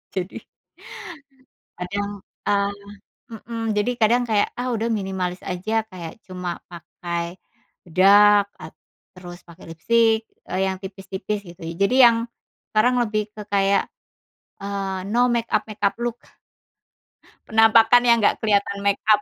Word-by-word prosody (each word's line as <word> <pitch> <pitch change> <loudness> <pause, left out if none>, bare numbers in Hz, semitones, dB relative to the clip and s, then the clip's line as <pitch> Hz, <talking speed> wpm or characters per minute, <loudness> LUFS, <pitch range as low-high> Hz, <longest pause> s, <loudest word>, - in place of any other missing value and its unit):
Jadi 185 +1 -4 1.3
Kadang, 200 +2 -4 0.2
ah 200 0 +2 0.6
mhm, 225 0 -4
jadi 210 +3 0
kadang 240 +1 +3
kayak, 215 -2 +1
ah, 255 - -2
udah 230 +1 -1
minimalis 190 -3 -3
aja 220 +5 -2
kayak 180 -1 -9
cuma 180 -2 -5
pakai, 170 +1 -6 0.5
bedak 200 +3 +5
at - - -11 0.4
terus 175 -1 -10
pakai 170 +1 -14
lipstik, 225 +7 +2 0.3
eee, 185 - -1
yang 190 - -2
tipis-tipis 190 +1 -5
gitu. 170 0 -13
Jadi 185 +8 0
yang 230 -1 +5 0.4
sekarang 245 +4 +2
lebih 215 -2 -1
ke 210 -1 -10
kayak, 200 -1 +2 0.7
eee, 195 -1 -3
no 240 +4 +2
make 235 -1 0
up-make 215 -1 -2
up 200 -1 +1
look. 240 -1 -2 1.3
Penampakan 225 +2 +6
yang 235 - +6
gak - - +3
keliatan 200 -2 +1
make 200 0 +1
up 210 -1 +5
205 Hz, 130 wpm, -22 LUFS, 190-225 Hz, 1.3 s, Penampakan